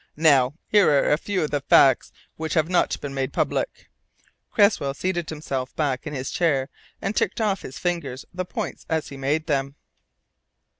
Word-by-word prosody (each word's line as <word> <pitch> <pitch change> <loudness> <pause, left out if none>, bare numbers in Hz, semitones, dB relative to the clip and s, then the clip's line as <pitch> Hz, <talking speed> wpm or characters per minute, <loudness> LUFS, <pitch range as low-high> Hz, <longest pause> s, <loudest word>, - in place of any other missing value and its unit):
Now 145 -4 +4
here 205 -2 +5
are 145 -2 +3
a 150 - +4
few 190 -3 -1
of 150 - -3
the 145 -1 0
facts 135 -2 +5 0.2
which 160 0 -3
have 160 -1 +3
not 180 0 +1
been 140 -1 -5
made 135 -1 -2
public." - - -2 0.6
Cresswell 200 -10 +3
settled 175 0 -2
himself 135 -4 -4
back 145 -2 -1
in 150 - -4
his 130 0 -4
chair 140 -6 +1 0.3
and 195 +3 -1
ticked - - 0
off 205 -4 0
on - - -5
his 135 - -9
fingers 160 -7 -3
the 185 +1 -2
points 180 - -5
as 160 -2 -1
he 140 - -8
made 145 +4 0
them. 140 -2 -1
150 Hz, 185 wpm, -24 LUFS, 135-175 Hz, 0.6 s, here